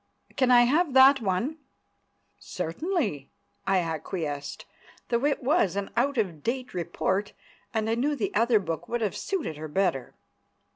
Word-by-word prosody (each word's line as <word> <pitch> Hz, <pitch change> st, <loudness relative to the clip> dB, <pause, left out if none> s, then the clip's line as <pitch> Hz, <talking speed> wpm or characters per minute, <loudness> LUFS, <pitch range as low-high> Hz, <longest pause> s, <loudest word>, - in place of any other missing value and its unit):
"Can 260 Hz, -2 st, +2 dB
I 245 Hz, -1 st, +7 dB
have 295 Hz, +4 st, +2 dB
that 265 Hz, 0 st, +7 dB
one?" 225 Hz, -, -1 dB, 0.8 s
"Certainly," 185 Hz, -, -3 dB, 0.4 s
I 195 Hz, 0 st, +3 dB
acquiesced, 160 Hz, -3 st, -4 dB, 0.4 s
though 235 Hz, +3 st, +1 dB
it 285 Hz, -2 st, -1 dB
was 250 Hz, -, +2 dB
an 200 Hz, -1 st, -3 dB
out 265 Hz, +3 st, +1 dB
of 180 Hz, -9 st, -1 dB
date 250 Hz, -, -3 dB
report, 185 Hz, +3 st, -2 dB, 0.4 s
and 220 Hz, -2 st, -1 dB
I 225 Hz, -, +1 dB
knew 280 Hz, +6 st, 0 dB
the 215 Hz, -7 st, -2 dB
other 230 Hz, +1 st, +4 dB
book 165 Hz, -2 st, -5 dB
would 240 Hz, 0 st, -1 dB
have 210 Hz, -3 st, -1 dB
suited 330 Hz, -, -3 dB
her 155 Hz, +1 st, -6 dB
better. 160 Hz, -5 st, -1 dB
215 Hz, 150 wpm, -27 LUFS, 175-260 Hz, 0.8 s, I